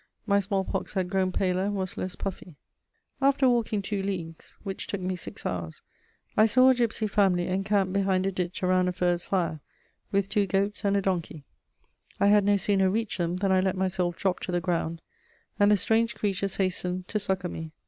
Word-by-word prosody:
My 200 -2 +3
smallpox 195 -1 -2
had 185 -1 -1
grown 190 -1 +1
paler 185 0 0
and 205 0 -1
was 190 -2 -3
less 185 0 -4
puffy. 185 -4 -6 0.7
After 275 0 +4
walking 230 -4 +1
two 200 0 -2
leagues, 175 -5 -5
which 195 -2 -4
took 200 - -3
me 185 0 -2
six 175 - -7
hours, 85 -3 -4 0.5
I 215 - +6
saw 255 +4 +5
a - - +7
gipsy 235 -3 0
family 195 -4 +2
encamped 195 0 0
behind 190 -1 +1
a 195 - +1
ditch 180 -1 -4
around 185 0 +3
a 180 - 0
furze 175 -1 0
fire, 170 -5 -1 0.5
with 200 -1 +1
two 205 -1 +1
goats 200 +2 -1
and 200 0 +2
a 200 - 0
donkey. 170 -5 -2 0.8
I 200 - +4
had 205 -1 +5
no 205 0 +4
sooner 195 -1 +2
reached 220 0 -2
them 170 0 0
than 195 +1 0
I 190 - +4
let 190 0 0
myself 185 -2 0
drop 190 -2 0
to - - -5
the 175 - +1
ground, 170 -2 -2 0.6
and 205 0 +5
the 210 - +5
strange 225 +3 +1
creatures 195 -1 -1
hastened 185 -1 -2
to 215 - 0
succour 190 -3 -2
me. 160 -1 -6
190 Hz, 200 wpm, -27 LUFS, 180-205 Hz, 0.8 s, a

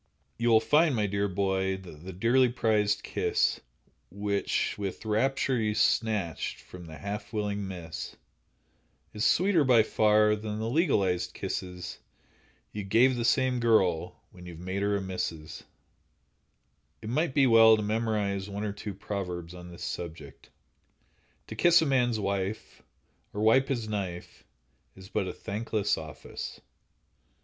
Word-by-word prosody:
You 120 0 +2
will 110 -1 +6
find, 150 +5 +3
my 105 -2 +1
dear 100 0 0
boy, 95 0 0
that 85 -5 -12
the 95 - -7
dearly 120 +7 +3
prized 110 -4 +1
kiss, - - 0 0.5
Which 100 +1 -1
with 100 +2 -5
rapture 130 +4 +1
you 105 -1 0
snatched 105 -12 0
from 90 -2 -12
the 80 -1 -9
half 105 +4 -6
willing 105 -2 -2
miss, 85 -4 -7 1.0
Is 105 - -1
sweeter 180 -3 +3
by 125 -4 +5
far 105 0 +3
than 105 0 -5
the 110 +1 -3
legalized 95 - +1
kisses 90 -2 -5 0.7
You 105 - -5
give 120 +6 +4
the 120 - -2
same 130 +1 +2
girl 95 -8 +2
when 90 -1 -13
you've 85 -2 -9
made 95 +3 -4
her 100 0 +1
a - - -2
Mrs. 90 -5 -5 1.4
It 110 - -5
might 145 +3 0
be 140 -2 +5
well 115 -2 +7
to 105 - -2
memorize 105 -2 -1
one 100 +1 -4
or 105 -2 -2
two 105 -1 -7
proverbs 90 -4 -5
on 90 0 -10
this 85 - -10
subject: 80 -5 -7 1.0
"To - - -8
kiss 175 0 +5
a 160 - +1
man's 125 -5 +1
wife, 100 +1 -3 0.5
or 105 - -2
wipe 130 +5 +4
his 120 -5 -2
knife, 95 -5 -5 0.5
is 95 0 -13
but 95 - -1
a - - -3
thankless 105 0 -2
office." 80 -2 -8
105 Hz, 145 wpm, -28 LUFS, 95-115 Hz, 1.4 s, well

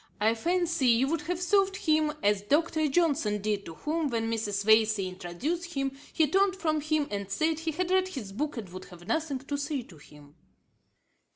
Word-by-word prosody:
I 220 +2 +3
fancy 335 +2 0
you 240 +3 +4
would 330 0 0
have 355 -1 -1
served 390 +2 +2
him 310 -3 +2
as 205 -1 +3
Dr. 310 +7 +1
Johnson 280 -9 +1
did, 205 -1 -2
to 165 - -8
whom 310 - -1
when 230 -3 -1
Mrs. 205 -3 -1
Vesey 220 -2 +4
introduced 265 - -4
him, 275 0 0 0.2
he 320 - +3
turned 385 +4 +3
from 310 -5 0
him, 310 -1 0
and 200 -1 -4
said 315 +10 0
he 325 0 -2
had 360 +3 -2
read 375 0 +3
his 255 - -6
book, 295 +7 -3
and 220 -4 -5
would 185 +1 -9
have 175 -2 -13
nothing 290 +4 -1
to 280 +2 -4
say 285 -2 -2
to 175 -7 -16
him.' 145 0 -16
280 Hz, 195 wpm, -28 LUFS, 210-325 Hz, 0.2 s, you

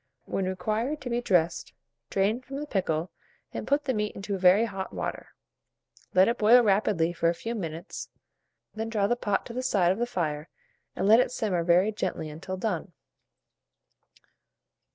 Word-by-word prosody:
When 195 - -2
required 215 +10 -1
to 250 - -5
be 240 +1 0
dressed, 175 -7 +1 0.4
drain 205 +5 +1
from 270 +1 -9
the 295 +2 -3
pickle, 180 - -1 0.4
and - - -5
put 285 +1 +2
the 260 - +1
meat 210 -1 -2
into 200 0 -3
very 190 +4 +5
hot 195 -3 -5
water; - - -5 0.8
let 185 +1 +6
it 235 +1 0
boil 235 +3 +7
rapidly 195 -5 +2
for 170 -1 +1
a 170 - 0
few 230 +6 -4
minutes, 170 -4 -6 0.6
when 220 +1 -4
draw 210 -3 +1
the 240 - +2
pot 205 -5 -1
to 235 - -8
the 255 - -2
side 195 -9 +2
of 190 - -2
the 240 - 0
fire, 155 -7 -3 0.5
and - - 0
let 220 +3 +7
it 250 - +2
simmer 195 -8 -1
very 180 +5 +4
gently 185 -6 -3
until 185 +5 -6
done. 185 -3 -3
200 Hz, 175 wpm, -27 LUFS, 180-230 Hz, 0.8 s, boil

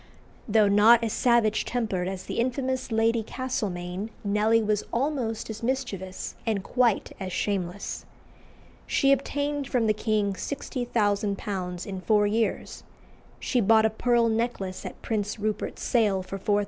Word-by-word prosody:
Though 215 -1 +4
not 220 +4 +6
as 225 - -1
savage 235 -3 +3
tempered 215 -7 -2
as 190 -1 -4
the - - -4
infamous 255 +1 -1
Lady 225 +1 +2
Castlemaine, 205 -5 -3
Nelly 210 +2 +3
was 215 -1 0
almost 240 -4 -1
as 220 - -8
mischievous, 230 -7 -3
and 215 -4 -1
quite 245 -2 +1
as 190 -1 -4
shameless. 195 0 -3 0.8
She 275 - +3
obtained 285 +1 0
from 250 -4 +1
the 215 - +3
king 210 -2 0
£60,000 205 -7 -2
in 190 -2 -5
four 210 +3 +3
years. 220 +2 -1 0.6
She 250 - +1
bought 220 +1 +5
a 220 - +2
pearl 235 +1 +2
necklace 220 -5 -2
at - - -10
Prince 210 -1 -2
Rupert's 215 0 -3
sale 205 -6 +2
for 195 +1 -6
£4000. 205 +2 +2
220 Hz, 140 wpm, -26 LUFS, 200-240 Hz, 0.8 s, not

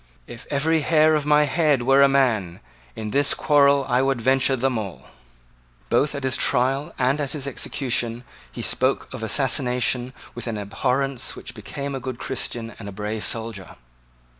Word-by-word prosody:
If 115 - -11
every 160 +3 +1
hair 155 +1 +3
of 150 -1 0
my 150 0 +5
head 150 -3 +1
were 135 +2 +4
a 140 - +7
man, 115 -10 +1 0.4
in 110 -1 -5
this 140 +3 +3
quarrel 140 -2 +3
I 125 +1 +2
would 135 -2 0
venture 130 +2 +2
them 130 -2 0
all." 100 -4 -7 0.8
Both 145 +1 +1
at 140 - -5
his 130 -1 +1
trial 135 +3 +1
and 135 +3 +1
at 140 -2 -2
his 145 -3 -4
execution 120 -3 -2 0.3
he - - -7
spoke 130 +1 0
of 130 - -7
assassination 125 +1 +1 0.2
with 120 - -7
the 115 -3 -3
abhorrence 130 +5 -1
which - - -9
became 140 0 -6
a 135 - -3
good 130 -1 -6
Christian 120 -3 -4
and 100 -2 -7
a - - -7
brave 105 +2 -4
soldier. 110 -4 -3
130 Hz, 170 wpm, -23 LUFS, 120-140 Hz, 0.8 s, a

